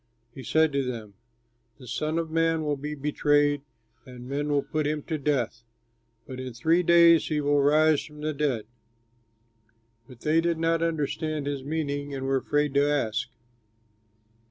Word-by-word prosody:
He 135 - -9
said 160 +3 +2
to 140 0 +1
them, 115 -5 -6 0.6
"The 130 - -13
Son 155 +6 -2
of 165 -1 -2
Man 165 0 +1
will 150 -1 0
be 150 +2 -5
betrayed 145 0 +1 0.4
and 125 -2 -11
men 145 +2 -2
will 145 -1 +1
put 155 -1 -2
him 150 -1 -2
to 160 -2 -3
death, 130 -5 -1 0.6
but 130 -1 -8
in 130 -1 -6
three 160 +9 +2
days 170 -1 +5
he 155 -1 -1
will 145 0 +2
rise 155 +1 +4
from 150 -1 -12
the 155 0 -2
dead." 140 -6 -1 1.4
But 125 -3 -15
they 160 +2 +2
did 170 -1 0
not 165 0 +1
understand 155 -2 -2
his 140 -2 -3
meaning 145 -1 -3
and 135 0 -4
were 135 0 +1
afraid 145 +1 0
to 140 +1 +3
ask. 115 -5 -1
145 Hz, 165 wpm, -26 LUFS, 135-155 Hz, 1.4 s, days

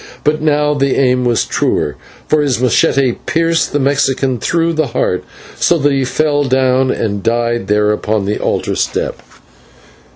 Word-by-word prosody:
But 150 +1 +1
now 150 -1 +2
the 140 -2 0
aim 125 -2 +2
was 120 -2 +1
truer, 75 - -1 0.3
for 155 0 +2
his 140 -4 0
/machete/ 125 +1 +2
pierced 165 0 +1
the 145 - 0
Mexican 135 -2 0
through 165 +6 0
the 155 -2 0
heart, 90 - 0 0.3
so 175 - +2
that 145 -1 +1
he 135 -1 0
fell 145 +2 0
down 130 -1 +2
and 100 -5 -2
died 120 -1 -1
there 105 0 +2
upon 105 -1 -1
the 105 +2 -2
altar - - -1
step. - - -2
135 Hz, 160 wpm, -15 LUFS, 120-150 Hz, 0.3 s, now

